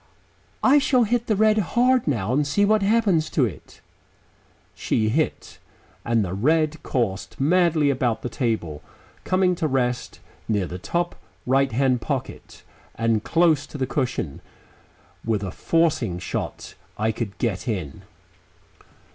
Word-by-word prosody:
I 280 Hz, +3 st, +6 dB
shall 265 Hz, -3 st, +3 dB
hit 235 Hz, +2 st, 0 dB
the 215 Hz, -, +2 dB
red 215 Hz, +1 st, +3 dB
hard 245 Hz, +5 st, +2 dB
now 115 Hz, -5 st, 0 dB
and 145 Hz, +2 st, +1 dB
see 205 Hz, +8 st, +2 dB
what 215 Hz, +1 st, +3 dB
happens 195 Hz, -6 st, +2 dB
to 140 Hz, -, +2 dB
it." 90 Hz, -, -9 dB, 0.9 s
She 110 Hz, -1 st, 0 dB
hit, 155 Hz, +7 st, -2 dB, 0.4 s
and 115 Hz, -3 st, +1 dB
the 90 Hz, -, -4 dB
red 155 Hz, +8 st, +1 dB
coursed 95 Hz, -9 st, -2 dB
madly 155 Hz, -1 st, +3 dB
about 120 Hz, -4 st, -1 dB
the -, -, -1 dB
table, 110 Hz, -, -2 dB, 0.4 s
coming 185 Hz, -1 st, +2 dB
to 170 Hz, -2 st, -1 dB
rest 125 Hz, -3 st, -1 dB, 0.3 s
near 105 Hz, -4 st, 0 dB
the 90 Hz, +1 st, -7 dB
top 175 Hz, -, -2 dB, 0.3 s
right 135 Hz, +1 st, +2 dB
hand 130 Hz, 0 st, +1 dB
pocket -, -, -5 dB, 0.3 s
and 115 Hz, -2 st, 0 dB
close 165 Hz, -4 st, +2 dB
to -, -, -8 dB
the 135 Hz, -, 0 dB
cushion. 125 Hz, -, -3 dB, 0.8 s
With 110 Hz, -3 st, -1 dB
a 95 Hz, -, -4 dB
forcing 145 Hz, -, 0 dB
shot 90 Hz, -, -5 dB, 0.2 s
I 110 Hz, +2 st, +1 dB
could 110 Hz, -2 st, -5 dB
get 115 Hz, -1 st, -2 dB
in. 90 Hz, -, -4 dB
135 Hz, 140 wpm, -23 LUFS, 110-175 Hz, 0.9 s, I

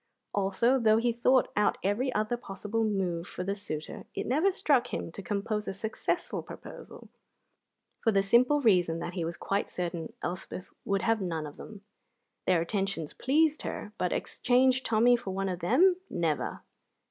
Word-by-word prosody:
Also, 205 Hz, +6 st, +2 dB
though 220 Hz, -2 st, +4 dB
he 235 Hz, +1 st, +1 dB
thought 250 Hz, +2 st, +3 dB
out 210 Hz, 0 st, +2 dB
every 220 Hz, +7 st, +1 dB
other 215 Hz, +3 st, +1 dB
possible 215 Hz, 0 st, -3 dB
move 185 Hz, -5 st, -1 dB
for 180 Hz, -, -5 dB
the 195 Hz, +2 st, -1 dB
suitor, 160 Hz, -7 st, -6 dB
it -, -, -2 dB
never 310 Hz, +10 st, +3 dB
struck 280 Hz, -9 st, +2 dB
him -, -, -4 dB
to 200 Hz, -, -8 dB
compose 210 Hz, +3 st, -2 dB
a -, -, -2 dB
successful 220 Hz, +3 st, -2 dB
proposal, -, -, -11 dB, 0.9 s
for 225 Hz, -, +2 dB
the 195 Hz, -2 st, +3 dB
simple 250 Hz, +8 st, +4 dB
reason 180 Hz, -8 st, +3 dB
that 170 Hz, +1 st, -5 dB
he 175 Hz, -2 st, -2 dB
was 170 Hz, +1 st, -4 dB
quite 200 Hz, +1 st, -1 dB
certain 170 Hz, -2 st, -4 dB
Elspeth 180 Hz, +1 st, -5 dB
would 195 Hz, -1 st, 0 dB
have 225 Hz, -2 st, +2 dB
none 165 Hz, -4 st, -2 dB
of 145 Hz, -, -9 dB
them. 210 Hz, -3 st, -10 dB, 0.7 s
Their 180 Hz, -3 st, +4 dB
attentions 195 Hz, -3 st, -2 dB
pleased 305 Hz, +3 st, +2 dB
her; 210 Hz, -, -5 dB
but 180 Hz, -, 0 dB
exchange 255 Hz, +1 st, +2 dB
Tommy 235 Hz, +1 st, +4 dB
for 195 Hz, -5 st, -4 dB
one 195 Hz, 0 st, -1 dB
of 180 Hz, -1 st, -3 dB
them 355 Hz, -, +4 dB
never! 165 Hz, -3 st, -1 dB
205 Hz, 170 wpm, -29 LUFS, 180-240 Hz, 0.9 s, though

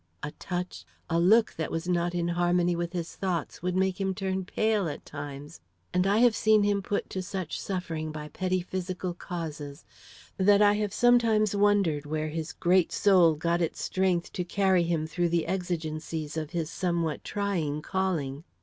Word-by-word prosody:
A 150 Hz, -, -3 dB
touch, 180 Hz, 0 st, -4 dB, 0.3 s
a 165 Hz, -, +3 dB
look 215 Hz, +6 st, +4 dB
that 160 Hz, -, -2 dB
was 165 Hz, +2 st, -3 dB
not 175 Hz, 0 st, 0 dB
in 170 Hz, 0 st, 0 dB
harmony 175 Hz, 0 st, +2 dB
with 170 Hz, 0 st, -3 dB
his 170 Hz, -2 st, -4 dB
thoughts, 180 Hz, -6 st, -3 dB
would 180 Hz, +1 st, -1 dB
make 190 Hz, +1 st, +1 dB
him 190 Hz, -1 st, 0 dB
turn 190 Hz, -1 st, -2 dB
pale 215 Hz, -2 st, +1 dB
at -, -, -7 dB
times, 145 Hz, +1 st, -8 dB, 0.3 s
and 180 Hz, +1 st, +2 dB
I 200 Hz, +2 st, +3 dB
have 235 Hz, -1 st, +5 dB
seen 215 Hz, -1 st, +4 dB
him 205 Hz, -1 st, +1 dB
put 200 Hz, +1 st, -2 dB
to 190 Hz, -, -2 dB
such 185 Hz, -2 st, -4 dB
suffering 165 Hz, -5 st, -3 dB
by 150 Hz, -1 st, -7 dB
petty 185 Hz, +1 st, -1 dB
physical 185 Hz, 0 st, -4 dB
causes, 155 Hz, -4 st, -6 dB, 0.5 s
that 200 Hz, +1 st, +5 dB
I 205 Hz, -1 st, +6 dB
have 210 Hz, -1 st, -1 dB
sometimes 225 Hz, -3 st, +3 dB
wondered 200 Hz, -8 st, +2 dB
where 155 Hz, +1 st, -2 dB
his 160 Hz, 0 st, -4 dB
great 180 Hz, 0 st, +2 dB
soul 180 Hz, -5 st, +5 dB
got 170 Hz, +3 st, 0 dB
its 165 Hz, -, -2 dB
strength 185 Hz, -2 st, 0 dB
to 180 Hz, -, -2 dB
carry 190 Hz, 0 st, +2 dB
him 165 Hz, -2 st, 0 dB
through 170 Hz, +2 st, -1 dB
the 170 Hz, -1 st, +1 dB
exigencies 160 Hz, -4 st, -3 dB
of 155 Hz, -2 st, -3 dB
his 165 Hz, -2 st, -3 dB
somewhat 170 Hz, -4 st, -1 dB
trying 170 Hz, -8 st, -2 dB
calling. 160 Hz, -7 st, -2 dB
175 Hz, 175 wpm, -28 LUFS, 160-190 Hz, 0.5 s, I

